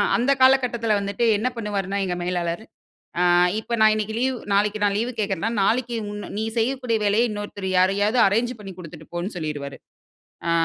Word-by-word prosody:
அந்த 250 +4 +2
காலகட்டத்தில 250 -4 +3
வந்துட்டு, 200 +4 -1
என்ன 220 - -1
பண்ணுவாருன்னா 200 -3 -2
எங்க 180 - -2
மேலாளரு! 175 +1 -2 0.6
அ - - +4 0.4
இப்ப 235 +2 -3
நான் 215 0 +6
இன்னிக்கு 215 0 -3
லீவு 260 +1 +1 0.2
நாளைக்கு 205 +1 +1
நான் 200 -1 +2
லீவு 235 +4 -1
கேக்கிறேன்னா, 200 0 -1
நாளைக்கு 240 +3 +1 0.2
உன்ன 205 0 -7
நீ 220 - -1
செய்யக்கூடிய 245 0 0
வேலைய 220 +4 +3
இன்னொருத்தர் 205 -2 -5
யாரையாவது 205 +5 +2
அரேஞ்ச் 230 +5 +1
பண்ணி 195 -2 -8
குடுத்துட்டு 160 -2 -11
போன்னு 175 +5 -3
சொல்லிருவாரு. 145 -3 -5 0.7
ஆ - - +2
210 Hz, 165 wpm, -23 LUFS, 195-235 Hz, 0.7 s, நான்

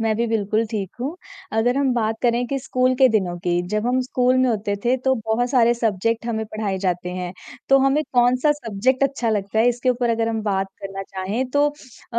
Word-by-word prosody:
मैं 225 -1 +1
भी 235 +1 0
बिल्कुल 215 0 0
ठीक 200 -4 -3
हूँ। 285 +7 -3 0.4
अगर 245 +4 +2
हम 275 -2 +2
बात 220 -1 0
करें 240 0 +2
कि 275 +2 -2
स्कूल 255 -1 +1
के 260 0 +5
दिनों 190 -6 0
की, 175 0 0
जब 215 +3 -1
हम 255 +1 +2
स्कूल 255 0 +1
में 255 0 +3
होते 210 -3 -1
थे 245 +2 +3
तो 265 0 +3
बहुत 240 +3 0
सारे 240 -3 +4
सब्जेक्ट 230 0 -1
हमें 220 -2 -2
पढ़ाए 210 -3 -3
जाते 180 -2 -2
हैं। 180 -1 -5 0.4
तो 270 - +6
हमें 270 +3 +2
कौन-सा 250 +4 +3
सब्जेक्ट 255 -1 -1
अच्छा 265 -4 -1
लगता 205 0 -1
है 235 - +5
इसके 245 +1 +1
ऊपर 240 -1 0
अगर 225 0 0
हम 225 -1 -2
बात 195 -2 0 0.2
करना 195 0 -5
चाहें, 195 +7 -3
तो 290 +2 +3 0.5
अ, - - +2
230 Hz, 215 wpm, -22 LUFS, 205-255 Hz, 0.5 s, तो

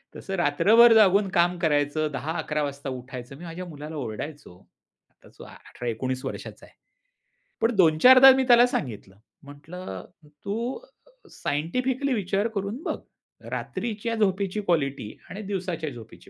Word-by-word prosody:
तसं 195 - -5
रात्रभर 210 +9 +5
जागून 205 -2 +5
काम 175 0 +2
करायचं 150 -1 0
10:00-11:00 150 +1 -3
वाजता 140 -1 -5
उठायचं. 130 0 -8
मी 170 - -12
माझ्या 170 +2 -7
मुलाला 155 -1 -9
ओरडायचो 140 - -7 0.5
आता - - -16
18-19 125 +2 -5
वर्षाचा - - -7
आहे. - - -23 0.9
पण 230 +1 +1
2-4 185 +8 +6
दा 270 +1 +10
मी 265 - +1
त्याला 240 -1 +7
सांगितलं 110 - -5 0.3
म्हटलं 145 - -9 0.2
"तू 210 - -5 0.5
सायंटिफिकली 255 - -2
विचार 200 -1 0
करून 200 +6 -3
बघ. - - -3 0.5
रात्रीच्या 230 0 -4
झोपेची 200 -1 0
क्वालिटी 140 - -1
आणि 200 - -7
दिवसाच्या 180 -6 -4
झोपेची 120 -5 -13
170 Hz, 125 wpm, -25 LUFS, 145-210 Hz, 0.9 s, दा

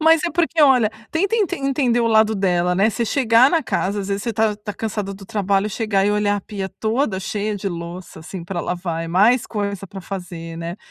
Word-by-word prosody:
Mas 320 0 +5
é 345 - 0
porque 330 0 +1
olha, 250 -6 +5 0.2
tenta 395 +7 +1
ente 380 -4 0
entender 270 -4 +1
o 230 - +2
lado 220 -1 +4
dela, 180 -2 +1
né? 200 +4 +3
Você 235 +2 -1
chegar 235 +1 +4
na 330 -3 +2
casa, 200 -3 -1
às 195 - -5
vezes 200 +1 -2
você 235 - -2
tá 220 -1 +1
tá 210 0 -6
cansada 210 -2 -4
do 195 0 -11
trabalho, 200 -2 0
chegar 210 -2 0
e 205 - +3
olhar 205 0 +1
a - - -4
pia 195 -1 -5
toda 220 0 -1
cheia 210 +2 -2
de 195 0 -3
louça, 170 -1 -7
assim, 175 +2 -7
pra 175 0 -3
lavar, 175 -2 -3
é - - -6
mais 215 +8 +4
coisa 200 -2 -3
pra 195 +2 -9
fazer, 175 -3 -7
né? 170 +2 -5
205 Hz, 225 wpm, -21 LUFS, 190-235 Hz, 0.2 s, Mas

